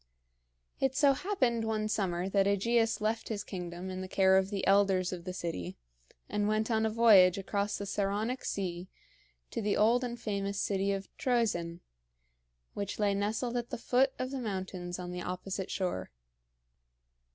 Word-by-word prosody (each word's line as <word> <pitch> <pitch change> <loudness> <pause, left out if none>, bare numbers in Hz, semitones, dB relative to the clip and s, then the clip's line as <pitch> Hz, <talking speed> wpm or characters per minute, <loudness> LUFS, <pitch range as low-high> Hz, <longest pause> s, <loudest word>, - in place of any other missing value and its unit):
It 265 -1 +1
so 280 -1 +5
happened 260 - 0
one 215 -1 -1
summer 185 -4 -1
that 195 0 +2
AEgeus 225 +2 +2
left 220 +1 -1
his 210 -2 -3
kingdom 180 0 -6
in 185 0 -5
the 185 - -5
care 190 0 +4
of 190 0 +3
the 200 -2 -2
elders 195 -2 +3
of 175 -1 -7
the 185 - -3
city 130 - -5 0.5
and 210 0 0
went 215 +2 0
on 220 0 +2
a - - 0
voyage 210 -5 +6
across 200 +1 -1
the 200 - -5
Saronic 205 +5 -1
Sea 180 -2 -3 0.6
to - - -2
the 205 -1 +1
old 235 +4 +4
and 240 -1 -4
famous 200 -3 -2
city 200 0 0
of 195 0 -5
Troezen, 215 - 0 0.9
which 200 -1 -4
lay 205 -1 +2
nestled 220 +5 -1
at 240 0 -3
the 250 - -4
foot 255 +3 +2
of 255 +1 -3
the 270 - -3
mountains 185 -5 -4
on 180 -1 -6
the 180 0 -5
opposite 185 +2 -4
shore. 185 -2 -2
200 Hz, 170 wpm, -31 LUFS, 185-225 Hz, 0.9 s, voyage